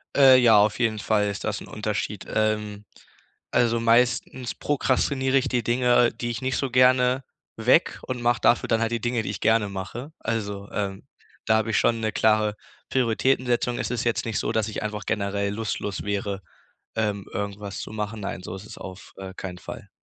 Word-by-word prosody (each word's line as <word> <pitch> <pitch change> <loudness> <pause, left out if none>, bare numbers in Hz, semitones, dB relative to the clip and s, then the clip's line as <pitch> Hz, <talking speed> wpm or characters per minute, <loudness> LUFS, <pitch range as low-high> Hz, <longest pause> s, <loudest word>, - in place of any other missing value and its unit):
Äh, 135 -2 +8
ja, 115 -4 +6
auf 105 +3 +3
jeden 110 -3 +1
Fall 105 0 +1
ist 100 - -5
das 105 -2 -2
'n - - -10
Unterschied. 105 -1 -3
Ähm, 105 -1 -1 0.7
also 115 -1 +2
meistens 120 +1 +2
prokrastinier 135 -1 0
ich 135 0 +3
die 120 -3 0
Dinge, 120 0 +3
die 120 - -4
ich 110 - -5
nicht 130 0 -1
so 135 -3 -2
gerne 125 +1 +4 0.3
weg - - +3
und 125 -2 -4
mach 120 0 +2
dafür 120 - +3
dann 115 0 +2
halt 115 - 0
die 115 -2 -1
Dinge, 120 -2 0
die - - -4
ich 100 - -7
gerne 110 -2 +3
mache. 100 +9 -6
Also, 100 -3 -3
ähm, 100 -2 -3 0.4
da 110 0 +4
hab 110 +1 0
ich 110 - +1
schon 115 -1 +2
'ne 110 - 0
klare 110 -1 +2 0.3
Prioritätensetzung. 120 0 +1
Es - - -2
ist 125 -1 -1
jetzt 120 - +1
nicht 115 -2 -1
so, - - -1
dass 110 -1 +1
ich 110 - -4
einfach 105 -1 -4
generell 100 -1 -1
lustlos 105 -2 -3
wäre, 100 -1 -2 0.6
ähm, 105 -3 -1
irgendwas 100 0 -4
zu - - -7
machen. 105 0 -4
Nein, 95 -2 -5
so 90 - -6
ist 95 - -10
es - - -10
auf, 95 0 -10
äh, 95 -1 -7
keinen 90 -2 -7
Fall. - - -9
110 Hz, 195 wpm, -25 LUFS, 105-120 Hz, 0.7 s, Äh